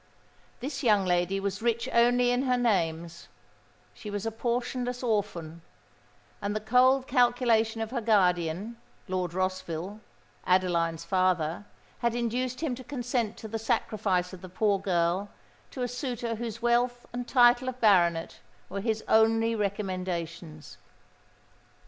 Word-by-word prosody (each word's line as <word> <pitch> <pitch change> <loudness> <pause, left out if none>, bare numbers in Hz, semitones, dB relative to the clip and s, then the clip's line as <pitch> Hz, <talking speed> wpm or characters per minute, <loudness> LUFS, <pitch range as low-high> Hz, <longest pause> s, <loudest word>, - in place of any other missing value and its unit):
This 275 +1 -4
young 210 -7 +3
lady 180 +2 +1
was 200 +2 -3
rich 235 +1 0
only 245 +1 +4
in 245 +1 +1
her 250 -1 +2
names: 170 -7 -1 0.7
she 210 - -9
was 205 +1 -4
a 225 - -1
portionless 245 +2 -2
orphan; 195 -8 -2 0.8
and 205 +1 -2
the - - 0
cold 255 +4 +4
calculation 240 -3 +2
of 220 0 -4
her 245 -2 -2
guardian, 190 0 +1 0.3
Lord 180 -2 -2
Rossville 185 +1 -3 0.5
(Adeline's 170 -3 +1
father), 180 - 0 0.3
had 235 0 0
induced 245 +2 -2
him 310 -6 -1
to 255 +1 -8
consent 245 -5 -2
to 220 - -8
the 225 +1 -4
sacrifice 195 -4 0
of 185 - -10
the 185 - -9
poor 200 +1 +1
girl 185 +1 0 0.4
to 255 - -5
a - - 0
suitor 245 -2 -3
whose 230 0 -6
wealth 240 +1 +1
and 245 0 -4
title 245 0 +5
of 255 0 -8
Baronet 175 -7 +3 0.3
were 200 +1 -4
his 220 0 -1
only 225 +1 +4
recommendations. 180 -7 -4
215 Hz, 135 wpm, -28 LUFS, 185-240 Hz, 0.8 s, title